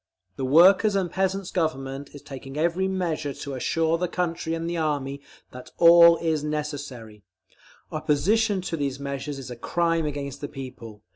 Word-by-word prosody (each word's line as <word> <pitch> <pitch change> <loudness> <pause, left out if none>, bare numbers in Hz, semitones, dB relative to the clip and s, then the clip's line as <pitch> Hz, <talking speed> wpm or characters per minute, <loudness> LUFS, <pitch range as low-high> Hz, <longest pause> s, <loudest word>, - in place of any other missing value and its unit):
The 130 - -3
Workers' 185 +9 +6
and 185 -3 0
Peasants' 190 0 -1
Government 140 -5 -2
is 145 - -11
taking 135 0 -9
every 170 +4 +1
measure 165 -7 -2
to 140 - -6
assure 165 +5 0
the 180 - 0
country 170 -2 -2
and 165 0 -4
the 170 - -2
Army 145 -4 -2 0.6
all 170 0 +8
that 170 - -8
is 155 -2 0
necessary. 145 -8 -5 0.7
Opposition 200 +7 +1
to 175 -2 -3
these 140 -3 -3
measures 140 +1 -5
is 135 -2 -8
a - - -5
crime 165 +5 0
against 140 -1 -5
the 145 - -3
People. 125 -6 -9
155 Hz, 160 wpm, -25 LUFS, 140-170 Hz, 0.7 s, all